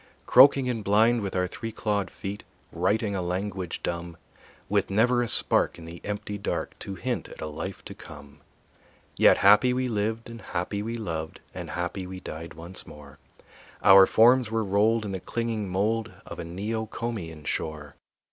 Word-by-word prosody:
Croaking 135 0 +7
and 115 -4 -2
blind, 110 +4 +4
with 100 -2 -4
our 90 0 +2
three 115 +5 -6
clawed 105 -2 -1
feet 100 +1 -7 0.3
Writing 100 +4 0
a 95 - -1
language 90 0 -3
dumb, 85 -1 -4 0.5
With 100 -1 +1
never 120 +5 +3
a 120 - 0
spark - - +2
in 85 - -11
the 85 +1 -10
empty 105 0 -4
dark - - -3
To 100 - -6
hint 125 +4 -3
at - - -12
a - - -4
life 80 +5 -6
to - - -7
come. 70 -2 -13 0.8
Yet - - +6
happy 105 +6 +6
we 130 0 0
lived 110 0 -2
and 115 -1 -9
happy 95 +3 -3
we 115 +2 -4
loved, 80 -7 -5
And - - -7
happy 90 +2 -3
we 95 0 -7
died 80 -2 -8
once 85 +3 -8
more; 70 -2 -13 0.6
Our 95 -1 +9
forms 120 +1 +5
were 115 0 0
rolled 105 +3 +2
in 100 - -4
the 95 - -3
clinging 115 -1 -3
mold 105 +3 0
Of - - -9
a - - -3
Neocomian 105 -2 -4
shore. 75 -2 -3
100 Hz, 175 wpm, -26 LUFS, 90-115 Hz, 0.8 s, Our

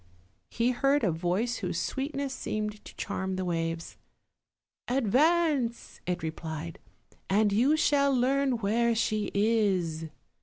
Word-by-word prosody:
he 235 +2 +1
heard 275 +3 +2
a 190 - +3
voice 180 +9 -1
whose - - -2
sweetness 275 0 -3
seemed 210 -3 -4
to - - -12
charm 190 -1 -3
the 185 0 -2
waves: 165 -1 -3 0.9
'Advance!" 270 - +1
it 180 -1 -2
replied, 160 0 -5 0.5
"and 205 +1 +3
you 265 +9 +4
shall 280 -2 +3
learn 265 +1 +2
where 230 +2 +1
she 215 -2 0
is." 195 -7 +1
220 Hz, 120 wpm, -29 LUFS, 185-265 Hz, 0.9 s, you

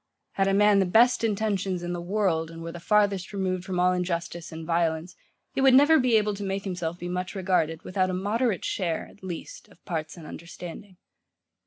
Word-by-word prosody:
Had 195 0 +1
a 195 - +2
man 210 0 +5
the 190 - +2
best 235 +6 +4
intentions 200 -4 0
in 175 0 -3
the 175 - -4
world, 175 -4 0
and 165 0 -9
were 165 - -5
the 175 - -8
farthest 200 -1 +2
removed 185 -2 -1
from 185 -1 -3
all 180 0 +4
injustice 175 -1 -3
and 160 0 -7
violence, 165 +1 0 0.4
he - - -1
would 265 -1 +6
never 295 +4 +7
be 250 -3 +3
able 210 -1 +1
to 200 0 -6
make 195 0 -2
himself 175 -3 -3
be 175 - -6
much 180 +2 -3
regarded, 180 -4 0
without 185 0 0
a - - -2
moderate 210 +2 0
share, 170 -4 -1
at 200 - -20
least, 190 - -7
of - - -23
parts 160 -2 -4
and 165 - -10
understanding. 175 +4 -9
185 Hz, 205 wpm, -26 LUFS, 170-205 Hz, 0.4 s, never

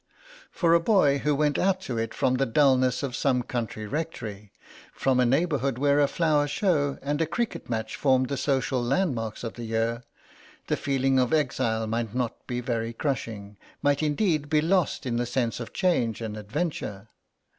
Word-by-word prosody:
For 170 -2 +2
a 170 - +6
boy 165 -8 +3
who 150 +1 +1
went 150 0 +1
out 190 0 +2
to 125 -10 -3
it 115 0 -2
from 130 0 +1
the 135 - +1
dulness 130 0 +3
of 130 -3 -3
some 125 -3 +1
country 115 -3 -4
rectory, 105 -7 -5 0.4
from 130 -2 +1
a 125 - +4
neighbourhood 140 -2 +1
where 140 +2 +3
a 145 - +4
flower 150 -1 +2
show 145 -4 +1
and 145 +3 -1
a 165 - +1
cricket 235 - -3
match 110 -1 -3
formed 130 -2 +2
the 140 - -1
social 130 -1 0
landmarks 120 - -1
of 115 - -4
the 120 - -8
year, 115 +1 -1 0.6
the - - 0
feeling 135 -1 +1
of 125 +2 +1
exile 120 -7 +1
might 115 0 -3
not 125 -2 -3
be 125 -1 -2
very 115 -1 -2
crushing, 110 -6 -4 0.3
might 145 0 +2
indeed 155 -1 +1
be 155 0 +3
lost 170 -1 +1
in 120 -2 -1
the 120 - 0
sense 120 -1 -1
of 120 - -6
change 125 - +1
and 110 -2 -5
adventure. 110 - -4
130 Hz, 180 wpm, -26 LUFS, 115-150 Hz, 0.6 s, a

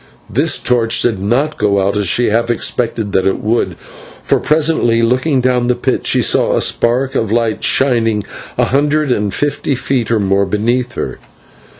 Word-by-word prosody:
This - - +1
torch 120 -2 +1
did 115 -5 0
not 125 +10 -1
go 100 -2 +1
out, 100 - -1
as 105 -2 0
she 120 +6 +2
half 115 +2 0
expected 115 -3 -1
that 95 -1 +1
it 95 - 0
would, 115 +3 -1 0.5
for - - +1
presently, 150 -7 +1
looking 130 +4 +1
down 125 -1 +1
the 125 - +1
pit, - - -1
she - - +3
saw - - +2
a - - 0
spark 130 +3 0
of 110 -6 -1
light 115 -1 0
shining 115 -5 +1 0.3
a - - +2
hundred 145 +1 0
and 105 -4 0
fifty 145 +1 -2
feet 125 -2 -2
or 115 -2 +1
more 100 0 +1
beneath 120 +4 -1
her. - - -5
120 Hz, 180 wpm, -15 LUFS, 105-130 Hz, 0.5 s, she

